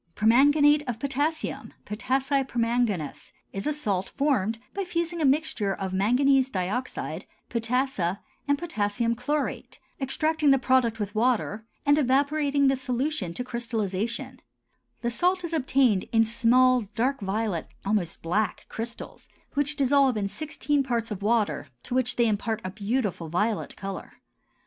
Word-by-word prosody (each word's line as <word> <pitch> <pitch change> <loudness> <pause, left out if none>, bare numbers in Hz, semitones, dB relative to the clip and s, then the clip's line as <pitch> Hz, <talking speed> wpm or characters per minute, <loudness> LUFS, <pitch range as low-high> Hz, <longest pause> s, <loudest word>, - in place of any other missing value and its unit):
PERMANGANATE 290 +6 +5
OF 240 -3 -2
POTASSIUM 285 +4 -2
(POTASSI 265 +6 0
PERMANGANAS) 230 - -1 0.2
is 195 +5 -3
a - - +2
salt 210 -11 -2
formed 230 -7 0 0.2
by 395 - -2
fusing 340 -2 -2
a - - +3
mixture 270 -9 +1
of 190 -1 -4
manganese 260 +7 +3
dioxide, 200 +5 -3 0.2
potassa, 230 -6 0 0.3
and 285 0 +3
potassium 230 -7 -1
chlorate, 285 +5 -3 0.2
extracting 310 +3 +1
the 270 - +6
product 255 -3 +2
with 205 -1 -3
water, 220 -2 0 0.2
and 290 +1 +5
evaporating 280 +1 +2
the 270 - +4
solution 255 - -2
to 250 - -3
crystallization; 235 +1 -3 0.6
the 235 - -1
salt 360 +8 +1
is 335 -1 -4
obtained 260 - +2
in 225 -1 +5
small 250 +2 +4
dark 260 +5 +1
violet, 200 -3 -2 0.2
almost 195 -5 -1
black 200 +6 -1
crystals 235 +1 -6 0.2
which 290 +1 0
dissolve 275 -3 +3
in 200 -1 0
sixteen 295 +3 -1
parts 235 -4 -2
of 200 -2 -4
water 215 -6 +1 0.2
to - - -6
which 250 -1 +1
they 240 - +3
impart 220 +1 -1
a 185 - -4
beautiful 205 -5 -2
violet 210 +6 -1
color. 195 -1 -6
245 Hz, 140 wpm, -26 LUFS, 215-280 Hz, 0.6 s, the